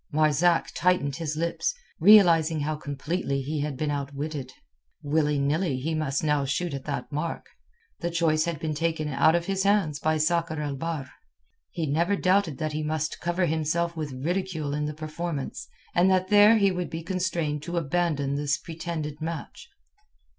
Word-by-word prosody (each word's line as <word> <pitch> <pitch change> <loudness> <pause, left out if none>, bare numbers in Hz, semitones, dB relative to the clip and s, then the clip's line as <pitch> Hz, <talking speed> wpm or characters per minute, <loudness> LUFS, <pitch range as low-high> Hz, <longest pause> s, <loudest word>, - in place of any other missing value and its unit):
Marzak 155 +3 +3
tightened 155 -7 +1
his 155 -2 -3
lips, 170 - -1 0.2
realizing 165 -5 +6
how 155 +2 -1
completely 145 0 -3
he 150 +3 -3
had 145 -2 -3
been 150 +1 -1
outwitted. 140 -1 -4 0.5
Willy 150 0 +1
nilly 145 +1 0
he 155 +6 -2
must 155 -3 -1
now 150 -2 +2
shoot 140 +4 -1
at 135 -1 -5
that 140 -3 -4
mark. 155 +3 -3 0.5
The 170 - -2
choice 165 -2 +2
had 170 -4 -3
been 155 -1 -2
taken 160 0 -1
out 160 +3 +4
of 170 0 0
his 195 0 -1
hands 195 -7 +2
by 155 0 +1
Sakr 160 0 0
el 145 -2 -2
Bahr. 155 -1 -4 0.6
He 165 - -3
never 170 +7 +1
doubted 185 -5 +2
that 155 -1 -2
he 155 - -2
must 155 +1 -2
cover 175 +1 0
himself 165 +2 0
with 155 -3 -4
ridicule 160 +2 -2
in 150 0 -1
the 150 0 -4
performance, 155 -1 -5 0.3
and 175 +2 +4
that 185 0 +2
there 210 +2 +7
he 200 -2 +3
would 180 -1 -3
be 165 0 -5
constrained 170 -5 -1
to 170 +3 -4
abandon 155 -3 0
this 145 +1 0
pretended 160 -1 -5
match. 170 - -6
155 Hz, 170 wpm, -26 LUFS, 145-170 Hz, 0.6 s, there